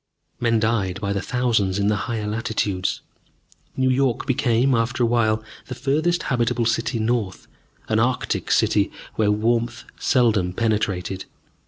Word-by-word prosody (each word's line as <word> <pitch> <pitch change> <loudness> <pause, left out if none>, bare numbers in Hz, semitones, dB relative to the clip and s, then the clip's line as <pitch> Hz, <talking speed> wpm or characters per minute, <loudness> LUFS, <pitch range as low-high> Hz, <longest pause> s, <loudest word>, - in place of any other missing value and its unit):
Men 115 -2 +2
died 105 -5 0
by 100 -1 -2
the 100 - -1
thousands 110 -4 0
in 100 0 +1
the 105 - +2
higher 110 -3 -2
latitudes. 105 -3 -1 0.8
New 130 0 +3
York 130 -2 +1
became, 125 0 +2
after 120 +1 +1
awhile, 110 -2 +2 0.2
the 125 - -5
furthest 155 +7 0
habitable 120 -1 0
city 115 +2 0
north, 110 -3 -1 0.4
an 110 0 +1
arctic 125 +2 0
city, - - +2 0.2
where 110 -2 +1
warmth 115 +3 0 0.2
seldom 105 -8 +2
penetrated. 95 -3 -1
115 Hz, 135 wpm, -22 LUFS, 105-120 Hz, 0.8 s, New